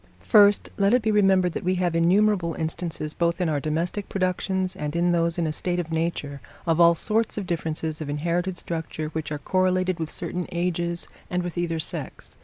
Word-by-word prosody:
First, 205 -2 +5
let 200 +3 +4
it 250 - +1
be 220 - +2
remembered 190 -3 +4
that - - -5
we 185 +1 +1
have 180 -2 0
innumerable 180 0 +3
instances, 160 -1 -3
both 170 +1 0
in 180 - +1
our 150 -2 0
domestic 165 +7 -2
productions 185 0 -1
and 150 +1 -4
in 175 +1 +2
those 170 0 +1
in 170 - 0
a 155 - 0
state 175 +2 -1
of 165 -2 -4
nature, 160 -4 -2 0.2
of 165 0 +2
all 170 0 +7
sorts 220 +6 0
of 205 - -2
differences 160 -2 -3
of 150 - -4
inherited 170 +5 -1
structure 160 -2 -4
which 155 -1 -4
are 150 - -1
correlated 185 +1 +1
with 160 -1 -3
certain 180 0 -3
ages 170 0 -1 0.2
and 180 0 -1
with 175 -1 -5
either 170 -2 -1
sex. 160 - -6
175 Hz, 200 wpm, -25 LUFS, 160-185 Hz, 0.2 s, all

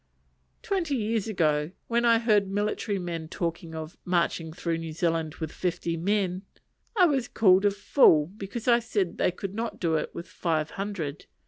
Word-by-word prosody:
Twenty 375 -10 0
years 225 -2 -1
ago, 155 -5 +1
when 235 0 +1
I 230 -1 +6
heard 215 -4 +3
military 205 +1 -1
men 170 -3 -4
talking 165 0 -4
of 160 0 -7
"marching 170 -2 0
through 165 0 -2
New 165 -1 -6
Zealand 165 -1 -1
with 160 -2 -5
fifty 175 -2 -2
men," 185 +1 0 0.6
I 365 - +7
was 275 -7 +1
called 190 -2 +4
a - - +6
fool 200 - +4
because 210 +3 -6
I 240 -1 +6
said 210 -6 -2
they - - +3
could 190 +2 -6
not 225 +2 -4
do 165 -3 0
it - - -2
with 170 - -6
five 160 -3 -1
hundred. 190 -8 -5
185 Hz, 175 wpm, -27 LUFS, 165-215 Hz, 0.6 s, I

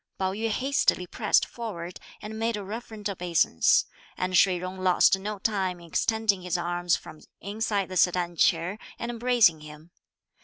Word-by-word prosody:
Pao 190 -1 -1
yü 225 +3 -2
hastily 260 -6 +1
pressed 210 +4 +2
forward 185 -7 -7 0.2
and 220 +1 -6
made 225 -1 0
a 205 - -6
reverent 215 0 -6
obeisance, 175 - +2 0.3
and 185 0 -1
Shih 180 +1 +5
Jung 185 +1 -6
lost 185 0 +4
no 210 +2 -4
time 190 -3 -1
in 170 - -13
extending 215 +2 0
his 180 -1 -2
arms 175 0 0
from 155 - -11 0.2
inside 205 -1 -2
the 185 - -4
sedan 175 -1 +2
chair, 170 +5 +1 0.2
and 235 0 -4
embracing 235 -8 +3
him. 150 +2 -13
190 Hz, 160 wpm, -27 LUFS, 175-220 Hz, 0.3 s, Shih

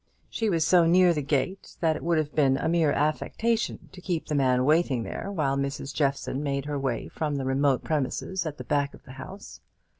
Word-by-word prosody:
She 225 -2 -1
was 165 -4 +2
so 175 -2 +5
near 180 +1 +5
the 150 - -1
gate 145 +7 -2
that 160 -2 +2
it - - -7
would 170 -1 +2
have 150 -2 -1
been 135 -3 +3
a - - -1
mere 165 -3 +3
affectation 220 +10 -1
to 185 - -12
keep 175 -4 -2
the 155 - -4
man 130 -3 +2
waiting 150 -5 +2
there 200 - -5
while 145 -8 0
Mrs. 140 0 -3
Jeffson 140 -1 -1
made 140 -1 -2
her 145 -1 -2
way 130 -4 -2
from 150 -2 -2
the 135 -1 -2
remote 135 0 +2
premises 160 +4 -2
at 150 -1 -6
the - - -7
back 145 -1 0
of - - -18
the 130 - -12
house. 195 +2 -10
150 Hz, 215 wpm, -27 LUFS, 140-170 Hz, -, so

